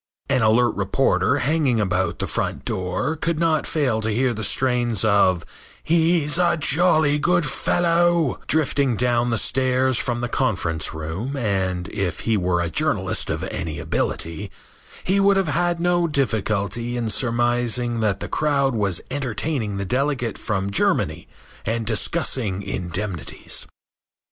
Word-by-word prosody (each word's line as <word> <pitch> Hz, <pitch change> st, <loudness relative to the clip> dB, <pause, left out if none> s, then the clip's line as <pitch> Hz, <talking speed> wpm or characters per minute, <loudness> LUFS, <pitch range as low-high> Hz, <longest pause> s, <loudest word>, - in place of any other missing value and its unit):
An 130 Hz, -2 st, +2 dB
alert 115 Hz, +2 st, +4 dB
reporter 130 Hz, +6 st, +1 dB
hanging 140 Hz, -4 st, +1 dB
about 95 Hz, -2 st, 0 dB
the -, -, -2 dB
front -, -, -3 dB
door 90 Hz, -, -2 dB
could 165 Hz, +1 st, -2 dB
not 160 Hz, -2 st, +1 dB
fail 130 Hz, -8 st, 0 dB
to 110 Hz, -, -1 dB
hear 120 Hz, +3 st, +1 dB
the 110 Hz, 0 st, -5 dB
strains 120 Hz, -1 st, +1 dB
of 95 Hz, -4 st, +3 dB, 0.4 s
"He's 165 Hz, -1 st, +2 dB
a 175 Hz, -1 st, +3 dB
jolly 155 Hz, -1 st, +3 dB
good 175 Hz, +1 st, +2 dB
fellow" 170 Hz, 0 st, +1 dB
drifting 140 Hz, -4 st, +1 dB
down 120 Hz, 0 st, +1 dB
the 115 Hz, -, 0 dB
stairs 130 Hz, 0 st, +2 dB
from 120 Hz, -2 st, -2 dB
the 120 Hz, -, -2 dB
conference 90 Hz, -, -1 dB
room 80 Hz, -, -4 dB
and, 95 Hz, -6 st, -1 dB
if 95 Hz, -6 st, -3 dB
he 115 Hz, -, +1 dB
were 90 Hz, -3 st, +1 dB
a 85 Hz, -, -2 dB
journalist -, -, 0 dB
of -, -, -2 dB
any 80 Hz, -2 st, -4 dB
ability, 80 Hz, -1 st, -2 dB, 0.5 s
he 190 Hz, +2 st, +1 dB
would 200 Hz, 0 st, +4 dB
have 175 Hz, -1 st, 0 dB
no 175 Hz, 0 st, +2 dB
difficulty 115 Hz, -, -1 dB
in 120 Hz, -2 st, -2 dB
surmising 120 Hz, 0 st, 0 dB
that 105 Hz, -3 st, 0 dB
the -, -, -4 dB
crowd 140 Hz, -3 st, +1 dB
was 100 Hz, -5 st, 0 dB
entertaining 130 Hz, -4 st, -2 dB
the 100 Hz, -, -3 dB
delegate 125 Hz, -1 st, -1 dB
from 100 Hz, -2 st, -2 dB
Germany 100 Hz, -, 0 dB, 0.4 s
and 115 Hz, +1 st, -2 dB
discussing 110 Hz, -, 0 dB
indemnities. 90 Hz, -4 st, -3 dB
120 Hz, 140 wpm, -22 LUFS, 100-145 Hz, 0.5 s, alert